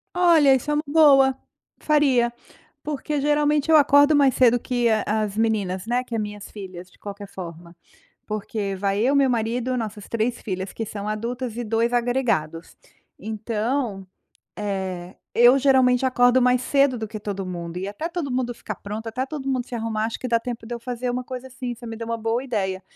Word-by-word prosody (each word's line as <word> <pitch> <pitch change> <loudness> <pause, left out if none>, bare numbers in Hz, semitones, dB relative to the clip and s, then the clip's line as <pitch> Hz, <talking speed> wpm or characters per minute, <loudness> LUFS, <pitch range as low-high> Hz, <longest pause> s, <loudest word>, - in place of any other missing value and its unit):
Olha 330 -6 +5
isso 265 +3 -3
é 295 - +2
uma 300 - 0
boa, 280 -3 +5 0.4
faria. 270 -6 +3 0.5
Porque 300 0 -3
geralmente 295 +1 +2
eu 315 - +8
acordo 285 +1 +5
mais 275 -2 +4
cedo 245 -1 +5
que 245 -1 0
a 220 -1 +2 0.2
as 205 -1 -4
meninas, 210 -3 0
né, 245 +1 +1
que 240 - -10
é 225 - 0
minhas 210 -1 -6
filhas 185 -3 -9
de - - -24
qualquer 205 0 -8
forma. 170 -2 -9 0.5
Porque 210 -1 -3
vai 195 +1 0
eu, 265 +4 +3
meu 275 -2 +4
marido, 245 +2 -1
nossas 215 -3 -5
3 230 +1 -1
filhas 190 -2 -4
que 225 - -4
são 205 -1 -6
adultas 235 +2 -3
e 240 - -2
2 230 +2 0
agregados. 235 -10 -1 0.4
Então, 220 0 -2 0.5
eh, 190 -3 -4 0.2
eu 240 +3 +6
geralmente 260 -2 +4
acordo 250 0 +4
mais 250 0 +3
cedo 275 -2 +2
do 220 - -4
que 215 0 -6
todo 195 -2 -4
mundo 175 -1 -5
e 190 +2 -4
até 205 +11 -5
todo 335 -5 -4
mundo 250 -1 -1
ficar 215 - -6
pronto, 210 +3 -7
até 255 +4 -2
todo 275 -1 -6
mundo 255 -2 -1
se - - -8
arrumar 220 -1 -2
acho 225 - -3
que 255 - -3
dá 230 0 +3
tempo 235 -1 -6
de 240 - -4
eu 235 - -7
fazer 245 0 -3
uma 250 +1 -3
coisa 255 0 -7
assim, 250 -1 -5
você 240 +1 -11
me 225 0 -6
deu 230 0 -6
uma 230 0 -2
boa 225 +3 -1
ideia. 190 -6 -2
235 Hz, 200 wpm, -23 LUFS, 210-260 Hz, 0.5 s, eu